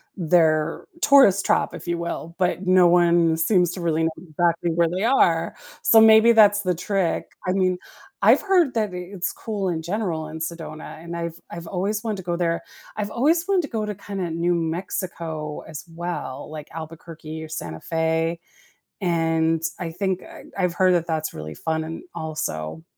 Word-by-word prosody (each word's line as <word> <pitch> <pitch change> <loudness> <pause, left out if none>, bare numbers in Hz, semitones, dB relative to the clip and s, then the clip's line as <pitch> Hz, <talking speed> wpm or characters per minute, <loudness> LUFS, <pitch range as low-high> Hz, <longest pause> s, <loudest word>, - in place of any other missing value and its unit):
their 160 -3 +2 0.2
tourist 265 -9 +6
trap, - - +1
if - - -9
you 170 0 0
will, 170 0 -5
but 185 0 0
no 185 -1 +6
one 170 -1 +4
seems 175 +1 +3
to 180 - -6
really 165 -1 +1
know 165 - +1
exactly 170 0 0
where 170 +1 +2
they 180 +4 -2
are. 200 -10 +3 0.3
So, 225 - +6
maybe 220 +1 +7
that's 205 -2 +6
the 180 -3 0
trick. 185 0 -1 0.2
I - - +2
mean, 185 -1 +1 0.4
I've - - +6
heard 360 -9 +3
that 215 -4 0
it 180 0 -6
it's 185 -2 -2
cool 205 -4 -3
in 165 -2 -2
general 170 -3 -2
in 160 +1 -7
Sedona, 160 -1 -7
and 170 0 -6
I've 170 0 -5
I've 170 0 -7
always 205 +4 -2
wanted 220 -3 -2
to 190 - -7
go 175 0 -2
there. 170 -1 -1 0.3
I've 210 0 -3
always 325 +8 +2
want 390 -2 +3
to - - -4
go 220 -5 -3
to, 210 -1 -4
kinda, 190 -2 -5
New 170 +2 +1
Mexico 165 -2 -4
as 155 -2 -8
well, 170 -6 -5
like 155 -1 -8
Albuquerque 160 0 -8
or 160 - -9
Santa 85 - -6
Fe, 165 +1 0 0.6
and 165 -2 +1 0.2
I 170 -3 -4
think 185 +2 -2
I - - -12
I've 180 -3 +1
heard 185 0 +3
that 170 -1 0
that's 160 -1 -2
really 75 0 -7
fun 160 - -2
and 160 - -7
also 155 - -4
170 Hz, 185 wpm, -23 LUFS, 160-190 Hz, 0.6 s, maybe